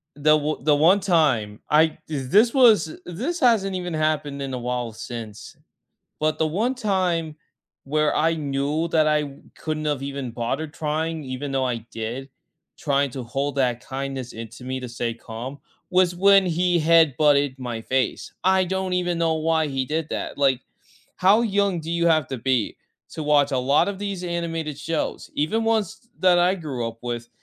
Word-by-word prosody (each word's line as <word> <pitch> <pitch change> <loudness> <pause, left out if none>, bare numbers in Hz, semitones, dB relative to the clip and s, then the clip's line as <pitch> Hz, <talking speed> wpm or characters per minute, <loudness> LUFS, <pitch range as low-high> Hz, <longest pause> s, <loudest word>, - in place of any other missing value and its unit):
the 155 +1 +4
o 150 +1 -3
the 150 0 +4
one 170 +7 +4
time 140 - +1
I 155 +1 +4
thi 150 -3 -3 0.2
this 230 +3 +6
was 220 - +4
this 260 - -4
hasn't 215 -7 +3
even 180 -2 -4
happened 155 -2 -1
in 135 -1 -4
a - - -2
while 125 -1 -3
since, 110 -2 -8 0.6
but 155 0 0
the 160 - +1 0.2
one 255 +2 0
time, 180 -8 0 0.5
where 150 +1 +1
I 165 +1 +2
knew 145 +2 -1
that 155 -1 +3
I 150 -2 0 0.2
couldn't've 155 -3 -2
even 140 -2 -4
bothered 120 +7 -3
trying, 160 +1 -2
even 130 +1 -5
though 135 -1 0
I 125 -2 -1
did 120 +5 -5 0.5
trying 140 -2 0
to 130 - -5
hold 135 +4 -2
that 125 -2 0
kindness 135 -2 -5
in 115 0 -7
to 115 +3 -13
me 130 +1 -3
to 125 -1 -7
stay 115 0 -3
calm 120 +5 -8 0.3
was 180 -1 +3
when 195 +1 +5
he 175 0 +1
headbutted 150 -3 +4
my 120 -3 -4
face, 130 +3 -2
I 190 0 +4
don't 190 0 -2
even 180 -1 0
know 165 -1 +2
why 160 0 +1
he 135 -2 -2
did 155 +2 -2
that, - - -4
like, 135 -3 +3 0.6
how 195 +4 +5
young 200 -5 +1
do 160 +1 -6
you 170 0 +1
have 155 -4 +3
to 130 - -4
be 125 -2 0 0.4
to 160 - -4
watch 145 -1 +3
a 130 - 0
lot 150 - +4
of 200 -1 -4
these 200 -3 -4
animated 165 -3 -3
shows, 155 +1 -3
even 165 +10 0
ones 220 -1 -1
that 180 -1 +5
I 180 +2 +3
grew 140 -10 -4
up 115 0 -7
with, 120 -1 -4
155 Hz, 180 wpm, -23 LUFS, 135-175 Hz, 0.6 s, this